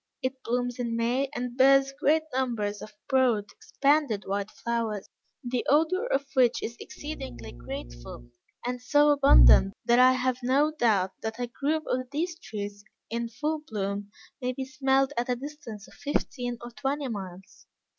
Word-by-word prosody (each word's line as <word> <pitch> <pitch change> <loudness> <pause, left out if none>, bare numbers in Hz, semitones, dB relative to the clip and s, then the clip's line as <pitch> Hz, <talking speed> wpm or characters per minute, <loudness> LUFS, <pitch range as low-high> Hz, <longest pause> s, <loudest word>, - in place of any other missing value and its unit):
It 260 0 -3
blooms 245 +1 -2
in 235 -2 -2
May, 245 +4 0
and 245 0 -4
bears 270 +1 +5
great 310 +2 +2
numbers 230 -6 -1
of 215 -1 -10
broad, 250 -7 +2
expanded 280 -8 +1
white 200 +1 -2
flowers, 230 -4 -3 0.4
the 245 0 -1
odor 325 - +3
of 275 - 0
which 255 -4 +3
is 235 - -4
exceedingly 130 - -8
grateful, - - -9 0.4
and 250 0 -3
so 290 +3 +4
abundant, 275 -8 +6
that 240 0 +4
I 255 +1 +7
have 255 0 0
no 275 +5 +2
doubt 215 -10 +2
that 220 0 -4
a 245 - 0
grove 290 +6 -1
of 255 0 -2
these 330 +5 -2
trees 205 - -6 0.3
in 235 0 -2
full 305 +7 -2
bloom, 205 -6 -4 0.3
may 250 0 -1
be 265 +1 -4
smelled 265 +1 +1
at 240 +1 -1
a 250 - +2
distance 245 -6 -9
of - - -17
fifteen 245 -4 -3
or 240 0 -8
twenty 270 +5 -2
miles. 195 -4 -8
250 Hz, 160 wpm, -27 LUFS, 215-275 Hz, 0.4 s, I